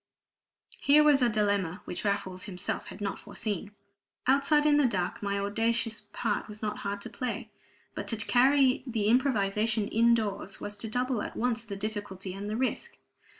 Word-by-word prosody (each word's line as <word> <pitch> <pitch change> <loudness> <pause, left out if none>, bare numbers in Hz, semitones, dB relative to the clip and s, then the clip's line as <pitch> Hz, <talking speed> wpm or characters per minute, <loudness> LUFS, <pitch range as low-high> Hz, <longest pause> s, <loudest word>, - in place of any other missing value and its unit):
Here 295 +2 +6
was 290 -3 +5
a 245 - +4
dilemma 205 -4 0
which 180 - -4
Raffles 190 -3 -2
himself 180 -3 -4
had 200 - -9
not 200 -1 -2
foreseen! 205 -1 -4 0.5
Outside, 280 +3 +4
in 295 -1 +5
the 290 -3 +5
dark, 185 -6 -2
my 200 -1 -1
audacious 225 +3 0
part 220 -3 -1
was 210 0 -8
not 210 -1 -3
hard 200 0 -3
to - - -5
play; 240 -2 -4 0.4
but - - -5
to 225 - 0
carry 260 +4 +3
the 225 -4 -1
improvisation 220 -4 +2
in 235 +1 +4
doors 205 -3 -3
was 205 - -4
to 220 +2 -4
double 250 0 0
at - - -6
once 235 -1 0
the 205 -2 -5
difficulty 200 -2 -5
and 200 +2 -5
the 215 - -2
risk. 260 +1 -2
215 Hz, 175 wpm, -29 LUFS, 200-245 Hz, 0.5 s, Here